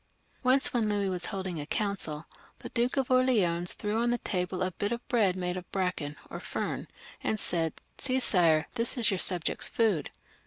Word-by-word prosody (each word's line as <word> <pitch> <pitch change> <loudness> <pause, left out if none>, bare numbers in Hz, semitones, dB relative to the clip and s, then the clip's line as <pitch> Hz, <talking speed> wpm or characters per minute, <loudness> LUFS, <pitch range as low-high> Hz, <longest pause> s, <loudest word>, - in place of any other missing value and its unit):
Once 265 +2 +3
when 230 -3 +1
Louis 205 -2 0
was 180 -1 -1
holding 190 -5 -4
a 145 - -7
council, 175 -8 -1 0.3
the - - -8
Duke 240 +3 0
of 265 -1 0
Orleans 200 -10 +3
threw 210 +1 -2
on 240 - +1
to 240 - +1
the - - -32
table 180 -1 -1
a 185 - -1
bit 205 +4 -3
of 235 0 -4
bread 205 -7 +2
made 180 -1 -2
of 180 - -9
bracken 180 -6 -2
or - - -7
fern, - - -4 0.4
and 215 - 0
said: 165 -4 0
" - - -41
See, 260 -1 +1
Sire, 165 -9 +4
this 235 +2 0
is 230 -5 +6
your 190 - -1
subjects' 175 -3 +3
food." 210 -11 +1
195 Hz, 200 wpm, -29 LUFS, 180-235 Hz, 0.4 s, is